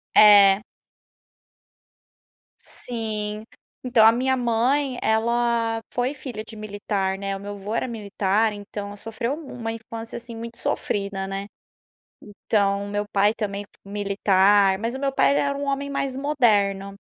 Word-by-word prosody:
É. 205 -1 +8 2.0
Sim. 215 -3 -4 0.4
Então, 240 -3 +4
a 225 - +9
minha 260 +3 +1
mãe, 250 +3 +1
ela 230 0 +1
foi 250 +3 0
filha 240 -7 -7
de 220 0 -10
militar, 200 -2 -2
né, 195 0 -3
o - - -11
meu 205 +1 -7
avô 205 +2 -6
era 255 - 0
militar. 210 -1 0
Então 205 0 -7
ela 205 - -9
sofreu 230 +6 -3
mu 315 -4 -10
uma 225 -2 -4
infância, 225 0 -7
assim, 235 -1 -8
muito 230 +1 -8
sofrida, 200 -1 -2
né. 195 +1 -4 0.8
Então 200 -1 0
o - - -7
meu 205 0 -1
pai 205 +2 +3
também 205 -2 -3
f 205 - -16 0.2
militar. 200 -1 +3
Mas 230 +4 -3
o - - -4
meu 275 -1 -1
pai 280 - +3
era 280 0 0
um 285 - -3
homem 280 0 -2
mais 275 -1 -2
moderno. 210 -9 +2
220 Hz, 150 wpm, -24 LUFS, 200-240 Hz, 2.0 s, a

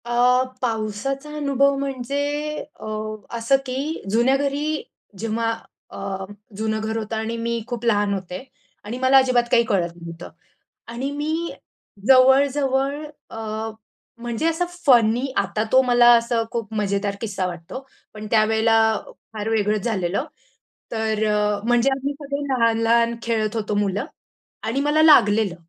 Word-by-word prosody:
अ, 245 +1 +3 0.2
पावसाचा 240 +5 -2
अनुभव 280 -1 +2
म्हणजे 275 0 -3 0.6
अ, - - -9 0.5
असं 230 +4 +3
की 275 +5 -3
जुन्या 240 +6 +3
घरी 285 +2 -1 0.4
जेव्हा 225 +1 -1 0.4
अ, 195 -1 -5 0.3
जुनं 220 0 -1
घर 220 +1 -2
होतं 225 0 -4
आणि 220 +1 -3
मी 230 0 -2
खूप 240 -2 -5
लहान 205 -3 +2
होते 185 0 -5 0.4
आणि 215 +4 -5
मला 260 +1 +5
अजिबात 255 -2 +4
काही 240 -2 +5
कळत 195 -7 0
नव्हतं 170 0 -9 0.6
आणि 260 +4 -3
मी 315 +4 -2 0.6
जवळ-जवळ 270 +2 +4 0.3
अ, 220 0 -5 0.5
म्हणजे 235 +3 -3
असं 330 +2 0 0.2
फनी 240 -2 +4
आता 200 +2 0
तो 260 - +7
मला 245 -1 +5
असं 235 0 +1
खूप 230 -2 -4
मजेदार 200 -1 -1
किस्सा 200 -4 -2
वाटतो. 175 +7 -7 0.3
पण 215 0 -8
त्यावेळेला 220 +1 +3 0.6
फार 215 0 -3
वेगळंच 210 -1 +1
झालेलं. 200 - -1 0.7
तर 220 -1 0
अ, 210 -1 +1
म्हणजे 240 +2 +3
आम्ही 275 +1 -2
सगळे 285 0 -5
लहान-लहान 230 -1 +2
खेळत 220 -1 -1
होतो 210 -2 -2
मुलं 205 +3 0 0.6
आणि 230 +5 -1
मला 295 +2 +2
लागलेलं. 220 - +5
230 Hz, 135 wpm, -22 LUFS, 215-265 Hz, 0.7 s, तो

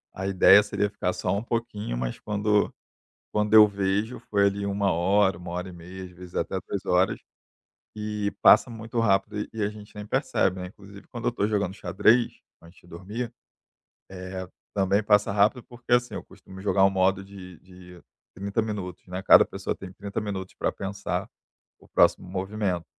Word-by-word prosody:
a 95 - -4
ideia 100 +1 +6
seria 105 0 -1
ficar 90 -3 -2
só - - -2
um 105 - -3
pouquinho, 115 - -3
mas - - -3
quando 105 0 +1 0.6
quando 105 0 +1
eu 110 -1 +10
vejo, 100 +3 -1
foi 100 -1 +3
ali 100 0 -1
1 100 -1 +1
hora, 95 +2 +2
1h30, 90 +1 -7
às 90 - -10
vezes 90 0 -13
até 95 +3 -2
3 95 +2 -5
horas, 90 +1 +2 0.8
e 105 -1 -2
passa 115 +4 +7
muito 115 +1 -4
rápido 100 -1 +1
e - - -4
e 110 - -3
a 100 - +1
gente 105 0 -13
nem 105 0 -7
percebe, 95 -2 0
né. 90 - -5
Inclusive 100 +1 -14
quando 120 -1 -8
eu 120 - +2
estou 105 -3 -1
jogando 100 -3 -1
xadrez 120 +3 +2 0.2
antes 85 +2 -17
de - - -22
dormir, 105 +8 -6 0.8
eh, 95 0 -6 0.3
também 100 +1 +2
passa 105 -1 +3
rápido, 105 +5 +2
porque 120 0 -8
assim, 120 0 +1
eu - - -5
costumo 95 0 -14
jogar 95 -1 +3
um 95 - +5
modo 95 0 +1
de 95 -3 -12
de 90 -1 -15 0.4
30 100 +4 -1
minutos, 100 -5 -5
né, 90 +1 -4
cada - - +8
pessoa - - -4
tem 95 -1 -10
30 100 +2 -5
minutos 95 -3 -5
para - - -1
pensar 100 +1 -4 0.5
o - - -20
próximo - - +3
movimento. 95 -1 -2
100 Hz, 175 wpm, -26 LUFS, 95-105 Hz, 0.8 s, eu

